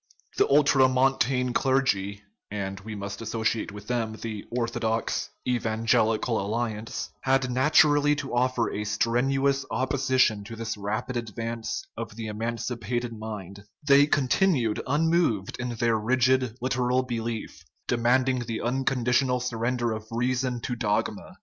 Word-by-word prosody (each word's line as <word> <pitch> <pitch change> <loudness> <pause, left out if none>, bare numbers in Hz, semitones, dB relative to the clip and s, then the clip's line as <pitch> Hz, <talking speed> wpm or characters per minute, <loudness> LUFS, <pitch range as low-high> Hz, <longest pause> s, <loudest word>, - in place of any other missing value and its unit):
The - - +4
ultramontane 130 -2 +3
clergy 105 -8 +1 0.3
(and 95 -2 -4
we 105 +2 -7
must 100 0 -6
associate 110 -1 -1
with 105 0 -10
them 115 -2 -1
the 110 -1 -6
orthodox 115 -1 -1
" - - -15
evan 115 -2 -1
gelical 115 +1 +2
alliance 110 +1 -3
") - - -42
had 135 -1 +2
naturally 145 +2 +4
to 140 -3 -5
offer 125 -1 +1
a 105 - -3
strenuous 135 +6 +1
opposition 130 -5 +1
to 115 +2 -8
this 115 0 -4
rapid 110 +5 -3
advance 115 - -4
of 105 - -6
the 115 0 -5
emancipated 115 +2 -3
mind; 100 -3 -7 0.2
they 140 0 +7
continued 135 - +2
unmoved 150 - +1
in 125 0 -2
their 115 -1 +1
rigid 130 +1 +2
literal 125 0 +1
^belief, 115 -2 -4 0.2
demanding 125 +2 +2
the 115 -2 -4
unconditional 125 0 +1
surrender 120 0 -1
of 110 0 -5
rea 120 +2 0
son 125 -1 -2
to 125 - -3
dogma. 105 - -2
120 Hz, 135 wpm, -26 LUFS, 110-130 Hz, 0.3 s, they